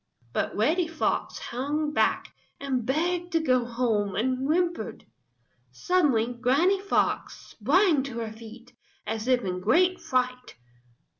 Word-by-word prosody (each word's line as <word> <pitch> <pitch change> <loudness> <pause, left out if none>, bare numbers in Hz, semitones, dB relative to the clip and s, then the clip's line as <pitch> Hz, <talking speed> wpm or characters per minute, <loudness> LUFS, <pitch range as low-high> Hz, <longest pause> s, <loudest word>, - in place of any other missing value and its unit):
But - - -1
Reddy 325 - +2
Fox 325 -1 -2
hung 295 +5 -2
back - - +1 0.3
and 260 -4 -2
begged 345 +5 -1
to 330 - +3
go 255 -6 +2
home 230 -5 -1
and 255 +4 0
whimpered. 345 +2 -1 0.7
Suddenly 275 -11 +1
Granny 285 +11 +2
Fox 400 - 0
sprang 310 - +3
to 255 -4 -6
her 225 -2 -4
feet, 230 +2 -13 0.3
as 220 +2 -4
if 250 -2 +3
in 180 -1 -2
great 355 - +2
fright. 250 0 -2
255 Hz, 130 wpm, -26 LUFS, 235-330 Hz, 0.7 s, to